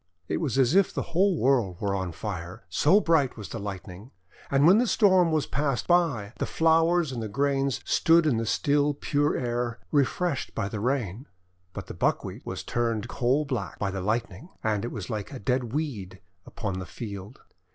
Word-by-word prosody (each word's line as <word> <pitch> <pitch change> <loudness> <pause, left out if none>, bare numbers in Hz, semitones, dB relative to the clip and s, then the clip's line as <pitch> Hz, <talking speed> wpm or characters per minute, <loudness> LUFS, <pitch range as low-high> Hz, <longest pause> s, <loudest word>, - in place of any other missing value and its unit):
It - - -1
was 140 -6 -1
as 130 +1 +4
if 195 0 +4
the - - -3
whole 185 +1 +3
world 120 -11 +1
were 100 -1 -1
on 95 -2 -2
fire, 90 -1 -6
so 155 - +4
bright 160 - +2
was 105 -6 -7
the - - -5
Lightning. 100 +1 -7 0.4
And 140 +1 +3
when 190 +6 +7
the 245 - +2
Storm 185 -6 +4
was 155 -3 +1
passed 140 -2 -1
by, 145 - +1
the - - -1
flowers 165 -1 +3
and 115 -4 -4
grains 140 +1 0
stood 165 0 +4
in 140 -7 +2
the 115 0 -2
still 145 +4 +2
pure 145 +1 0
air, 120 -1 -2
refreshed 145 +2 0
by 100 - -2
the 105 - -4
Rain. 120 -1 -2 0.4
But - - -7
the - - -8
Buckwheat - - -1
was - - -4
turned 115 -1 -1
coal 130 +8 +1
black 120 - -4
by 100 -1 -2
the 95 0 -4
Lightning, 110 - -2
and 110 -1 0
it 120 - -4
was 105 -6 -6
like 105 -3 -4
a 135 - -6
dead 125 +3 0
weed 115 - -4 0.3
upon 100 -5 -4
the 90 - -6
field. 100 +3 -8
125 Hz, 190 wpm, -27 LUFS, 105-150 Hz, 0.4 s, when